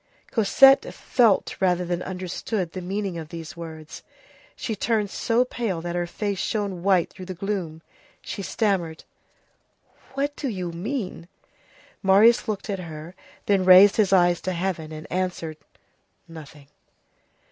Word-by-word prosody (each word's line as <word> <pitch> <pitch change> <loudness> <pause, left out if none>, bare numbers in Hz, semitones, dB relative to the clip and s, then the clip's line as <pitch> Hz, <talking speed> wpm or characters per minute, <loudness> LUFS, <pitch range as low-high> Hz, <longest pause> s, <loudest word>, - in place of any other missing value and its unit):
Cosette 270 +5 +5
felt 230 -6 +2
rather 180 -1 +1
than 175 0 -2
understood 185 0 -4
the 185 - -6
meaning 190 -1 -3
of 155 -1 -8
these 165 +2 -8
words. 160 -2 -9 0.5
She 220 - -4
turned 210 -1 0
so 240 +2 +1
pale 225 -8 -3
that 175 +1 -5
her 175 0 -1
face 200 +1 -3
shone 200 -5 -2
white 185 -2 +2
through 185 - -10
the 185 - -6
gloom. 175 -4 -4 0.4
She - - -6
stammered:— 190 -6 -1 1.1
"What 285 +1 -1
do 285 - -4
you 185 -5 -4
mean?" 185 -1 -5 0.7
Marius 215 +6 +5
looked 210 -1 -3
at 200 -3 -3
her, 160 -1 -8 0.3
then 195 -2 +2
raised 185 +2 +8
his 205 -3 +3
eyes 175 -2 +4
to 185 - -2
heaven, 170 -3 -3
and 155 0 -8
answered: 180 -4 -3 0.7
"Nothing." 155 -3 -12
185 Hz, 140 wpm, -24 LUFS, 170-205 Hz, 1.1 s, raised